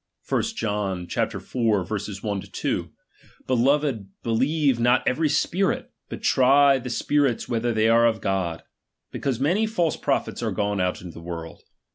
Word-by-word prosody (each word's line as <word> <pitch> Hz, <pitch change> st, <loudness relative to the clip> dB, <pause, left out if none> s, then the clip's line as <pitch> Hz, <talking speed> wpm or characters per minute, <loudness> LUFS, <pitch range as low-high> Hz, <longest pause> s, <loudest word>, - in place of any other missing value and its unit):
I -, -, +3 dB
John 100 Hz, -5 st, -2 dB
iv. -, -, -3 dB
1 110 Hz, -6 st, +2 dB, 0.6 s
2: -, -, -3 dB, 0.6 s
Beloved, 130 Hz, -3 st, +1 dB, 0.2 s
believe 135 Hz, +3 st, +1 dB
not 120 Hz, +2 st, +3 dB
every 155 Hz, +4 st, +2 dB
spirit, 190 Hz, +5 st, 0 dB, 0.2 s
but -, -, -7 dB
try 135 Hz, +1 st, +5 dB
the 125 Hz, 0 st, -6 dB
spirits 140 Hz, 0 st, +1 dB
whether 120 Hz, 0 st, 0 dB
they 110 Hz, -1 st, +2 dB
are 115 Hz, +1 st, +5 dB
of 110 Hz, -1 st, 0 dB
God; 95 Hz, -5 st, -2 dB, 0.5 s
because 130 Hz, -4 st, -2 dB
many 180 Hz, +11 st, +2 dB
false 175 Hz, -8 st, 0 dB
prophets -, -, -1 dB
are -, -, -1 dB
gone 100 Hz, -1 st, -1 dB
out 90 Hz, 0 st, -1 dB
into 90 Hz, -2 st, -9 dB
the -, -, -10 dB
world. 85 Hz, -1 st, -7 dB
120 Hz, 145 wpm, -24 LUFS, 105-140 Hz, 0.6 s, try